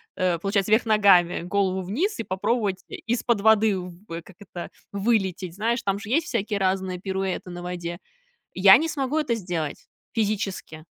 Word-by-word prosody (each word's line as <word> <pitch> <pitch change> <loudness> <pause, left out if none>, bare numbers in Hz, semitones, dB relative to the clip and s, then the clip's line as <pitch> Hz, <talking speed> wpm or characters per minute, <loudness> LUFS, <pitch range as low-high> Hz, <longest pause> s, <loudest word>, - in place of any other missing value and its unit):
э, 180 -3 +1
получается 200 +2 0
вверх 220 +2 +4
ногами, 200 -6 +4
голову 190 +1 0
вниз- 255 - -2
и - - -1
попробовать 195 +1 -1
и - - -7 0.2
из-под 235 -3 0
воды 220 -2 +4
в 180 -1 -7 0.3
как 185 -3 -17
это, 180 -3 -8 0.2
вылететь. 195 -4 0
Знаешь, 230 +3 -1
там 195 0 0
же 205 - -9
есть 320 +6 +1
всякие 210 - -1
разные 190 -1 0
пируэты 190 -1 -3
на 175 0 -7
воде. 175 -1 -5 0.6
Я 190 +1 +8
не 325 +1 -1
смогу 275 0 -1
это 275 -7 +1
сделать. 175 -7 -4 0.3
Физически. 200 -7 -2
195 Hz, 165 wpm, -25 LUFS, 185-220 Hz, 0.6 s, Я